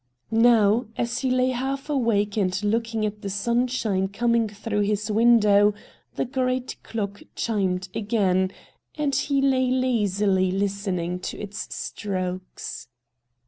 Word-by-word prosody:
Now, 225 -1 +4
as 235 0 -1
he 265 - 0
lay 255 0 +2
half 270 +2 -3
awake 230 -8 +1
and 190 -1 0
looking 225 +1 0
at 210 0 -4
the 200 - -4
sunshine 230 -2 0
coming 235 +2 +1
through 210 +1 -3
his 210 +1 0
window, 210 -2 +5 0.4
the - - 0
great 255 0 -1
clock 205 -3 -4
chimed 190 -5 -1
again, 190 -4 +1 0.5
and 295 -2 0
he 275 0 +1
lay 260 -2 +3
lazily 205 -7 +1
listening 190 -2 -1
to - - -5
its 210 +1 -5
strokes. 185 -2 -5
215 Hz, 125 wpm, -24 LUFS, 200-245 Hz, 0.5 s, window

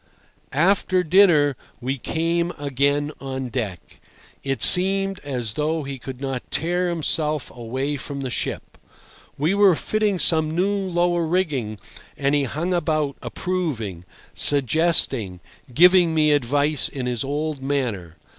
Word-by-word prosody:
After 185 +4 +2
dinner 160 -5 +4 0.2
we 130 +2 -3
came 170 +4 -1
again 145 +1 0
on 130 -1 -5
deck. 105 - -6 0.4
It 135 -1 -2
seemed 195 +1 +4
as 125 -6 -4
though 155 +4 -1
he 135 -1 -6
could 130 0 -8
not 135 -2 -5
tear 175 +2 -1
himself 155 -3 -1
away 130 +5 -3
from 140 +1 -6
the 130 -2 -4
ship. - - -5 0.6
We 155 +6 +1
were 200 -3 +5
fitting 210 +2 -1
some 160 -2 +3
new 180 +6 0
lower 175 -3 0
rigging, 150 - -1 0.4
and 140 +1 0
he 145 -1 +2
hung 160 +8 -3
about, 155 -4 -1
approving, 135 - -4 0.3
suggesting, 140 - +2 0.3
giving 175 +3 +5
me 155 -1 +3
advice 145 +2 +2
in 130 -3 -5
his 120 -2 -2
old 145 +1 -3
manner. 120 - -3
145 Hz, 130 wpm, -22 LUFS, 135-175 Hz, 0.6 s, were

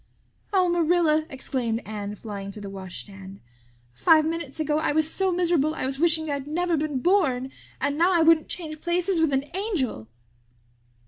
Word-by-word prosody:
"Oh, 375 -3 +3
Marilla," 330 -2 +2
exclaimed 250 -3 -2
Anne, 210 -1 -5
flying 200 -2 -7
to 210 - -9
the 200 -1 -7
washstand. 195 0 -9 0.5
"Five 310 - +4
minutes 320 -3 -4
ago 305 0 +1
I 315 - 0
was 315 0 +3
so 380 +3 +1
miserable 340 -4 +1
I - - -2
was 270 +1 -2
wishing 320 -1 +3
I'd 285 -2 -3
never 345 +3 0
been 295 -4 -2
born 270 -9 +2 0.3
and 285 +2 -1
now 350 +3 +4
I 340 -3 +4
wouldn't 320 -1 +4
change 310 -3 -5
places 350 +1 +1
with 320 -2 +2
an 270 +1 0
angel!" 335 - -2
310 Hz, 170 wpm, -25 LUFS, 255-340 Hz, 0.5 s, Five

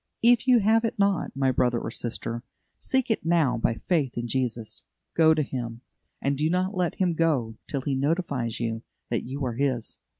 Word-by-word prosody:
If 240 +1 +5
you 245 -3 +6
have 220 +3 +4
it 225 - -1
not, 200 -2 +2
my 135 -1 +2
brother 125 -1 +2
or 115 - -5
sister, 115 0 -4 0.4
seek 260 -3 0
it 225 - 0
now 160 -7 +3
by 115 - +1
faith 150 -9 +1
in 120 0 -2
Jesus. 120 -3 -2 0.3
Go 160 -1 +5
to 155 - +1
Him, 120 -4 -5 0.4
and 140 +1 0
do 150 +3 +1
not 185 +3 0
let 180 -3 0
Him 180 -3 +1
go 150 -9 +1
till 140 - -2
He 140 +1 -1
notifies 140 -5 -1
you 115 -1 -2 0.3
that 115 - -1
you 135 +2 -3
are 120 - -2
His. 125 -2 -1
140 Hz, 195 wpm, -26 LUFS, 120-175 Hz, 0.4 s, you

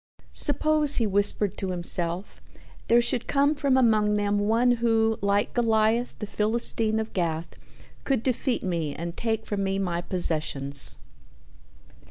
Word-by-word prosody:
"Suppose," 300 0 +1
he 230 - +2
whispered 205 -1 0
to 195 - -4
himself, 175 +1 0 0.5
"there 235 +1 +4
should 240 0 0
come 285 +1 +2
from 280 -3 +1
among 215 -4 +2
them 205 0 0
one 230 +4 +2
who, 225 -1 +1
like 200 0 0
Goliath 230 0 +1
the 210 - -5
Philistine 220 +1 0
of 220 0 -5
Gath, 165 -2 -3 0.5
could 265 -5 -1
defeat 255 0 -1
me 165 -5 -3
and 170 +1 -6
take 225 -1 -2
from 200 -1 -3
me 195 0 -1
my 175 -3 -2
possessions." 145 - +1
210 Hz, 140 wpm, -25 LUFS, 185-235 Hz, 0.5 s, there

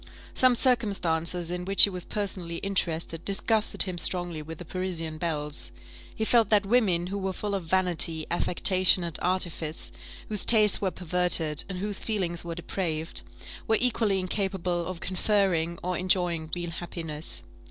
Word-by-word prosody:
Some 255 -1 +4
circumstances 180 -9 +1
in 180 0 -3
which 195 +2 +6
he 200 - +6
was 180 -1 -4
personally 185 -5 -3
interested 170 -3 -2
disgusted 215 +2 +2
him 185 -3 -4
strongly 175 -4 -2
with 160 +1 -8
the 175 - -9
Parisian 165 -3 -4
belles; 150 -3 -1 0.4
he 220 - -1
felt 230 -2 +3
that 210 -2 +3
women 195 -6 +2
who 200 +2 -4
were 190 -1 -2
full 205 +2 -4
of 195 -4 -3
vanity, 170 -2 +1
affectation, 185 +1 +3
and 170 -2 -3
artifice, 175 -3 -1 0.4
whose 210 -3 +2
tastes 215 -3 +5
were 195 - +1
perverted, 175 -4 +1
and 190 - -4
whose 205 +1 -2
feelings 180 -6 -2
were 170 -1 -5
depraved, 165 - -2 0.5
were 220 - +3
equally 225 -5 +1
incapable 185 -2 -2
of 185 -1 -6
conferring 185 -3 0
or 180 0 -1
enjoying 175 -3 0
real 175 -1 -4
happiness. 165 - -3
180 Hz, 150 wpm, -27 LUFS, 170-195 Hz, 0.5 s, which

